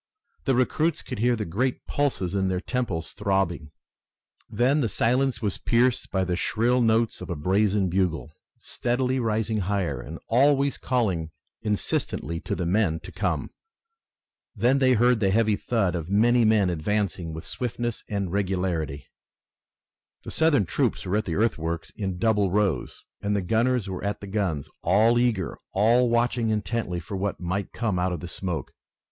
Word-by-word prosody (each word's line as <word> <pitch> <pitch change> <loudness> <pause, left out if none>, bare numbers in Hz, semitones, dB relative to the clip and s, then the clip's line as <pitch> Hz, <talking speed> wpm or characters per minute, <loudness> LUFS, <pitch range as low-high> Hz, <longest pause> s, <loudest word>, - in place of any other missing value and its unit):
The 135 - +2
recruits 155 +6 +1
could 125 - -6
hear 120 +2 +3
the 105 -2 -3
great 120 +10 -1
pulses 110 -11 -1
in 95 -1 +1
their 95 -1 0
temples 100 -7 -3
throbbing. 95 -7 -1 0.8
Then 135 +5 +2
the 115 - 0
silence 125 +5 +1
was 100 -3 -1
pierced 120 +1 +2
by 95 -1 0
the 90 -1 -1
shrill 120 +6 +1
notes 115 0 +2
of - - -7
a 85 - -2
brazen 95 +5 +2
bugle, 85 -4 -1 0.2
steadily 125 +2 -1
rising 110 -1 0
higher 90 -9 -1
and 80 +6 -8
always 140 +3 +3
calling 95 -11 0 0.3
insistently 85 -5 -2
to - - -3
the 90 - -2
men 90 -3 +1
to - - -10
come. - - -2 1.0
Then 130 +3 +3
they 130 -1 +4
heard 120 0 +4
the 100 -3 +2
heavy 110 +1 +3
thud 100 -5 0
of 85 -1 -4
many 115 +4 +4
men 105 -4 +3
advancing 90 0 -1
with 80 0 -7
swiftness 120 -1 -3
and 100 -4 -2
regularity. 90 -7 -1 1.2
The - - -7
Southern 160 -9 +3
troops 85 - -1
were 95 +3 0
at 105 - -1
the 85 - -2
earthworks 85 -7 -1
in 95 -4 -4
double 105 -1 +2
rows, 100 -2 -1 0.2
and 105 0 0
the 100 - 0
gunners 115 +3 +1
were 95 -1 -5
at 100 0 -2
the - - -8
guns, 95 -8 -2
all 110 +6 +4
eager, 110 -9 0
all 115 +5 +4
watching 120 0 +1
intently 105 -4 -1
for 85 +4 -7
what 95 +1 -2
might 95 +3 -3
come 110 -6 -1
out 90 +1 0
of 90 - -3
the 90 - -7
smoke. 90 -2 -4
105 Hz, 165 wpm, -25 LUFS, 90-120 Hz, 1.2 s, they